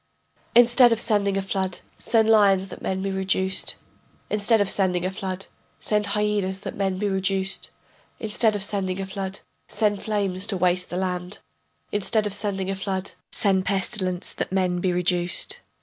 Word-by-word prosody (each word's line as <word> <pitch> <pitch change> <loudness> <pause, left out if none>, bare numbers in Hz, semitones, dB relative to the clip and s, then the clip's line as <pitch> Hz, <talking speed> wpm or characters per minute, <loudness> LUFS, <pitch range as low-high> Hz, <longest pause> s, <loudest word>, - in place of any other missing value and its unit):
Instead 240 +1 +7
of 230 - +2
sending 200 -4 +2
a 195 - -1
flood, 190 -1 -2
send 225 -2 +1
lions 200 -3 +4
that - - -10
men 190 0 -2
be 195 - -2
reduced; 190 0 -1 0.6
Instead 210 +2 +3
of 205 - +2
sending 185 -2 0
a 185 - -1
flood, 190 -1 -5 0.3
send 210 -1 +1
hyenas 205 -2 -1
that - - -6
men 195 -2 -1
be 205 +2 -1
reduced; 190 0 -1 0.5
Instead 220 0 +1
of 200 - -3
sending 195 -2 -2
a 195 - -3
flood, 195 0 -5 0.3
send 205 -2 0
flames 200 -2 -1
to 200 -3 -1
waste 180 0 +1
the 175 - -4
land; 180 0 -3 0.5
Instead 210 +2 0
of 205 - -3
sending 195 -2 -1
a - - -2
flood, 190 0 -3 0.2
send 190 -2 +1
pestilence 185 -2 +1
that - - -4
men 185 -2 0
be 180 0 0
reduced. 175 0 +3
195 Hz, 165 wpm, -24 LUFS, 185-205 Hz, 0.6 s, Instead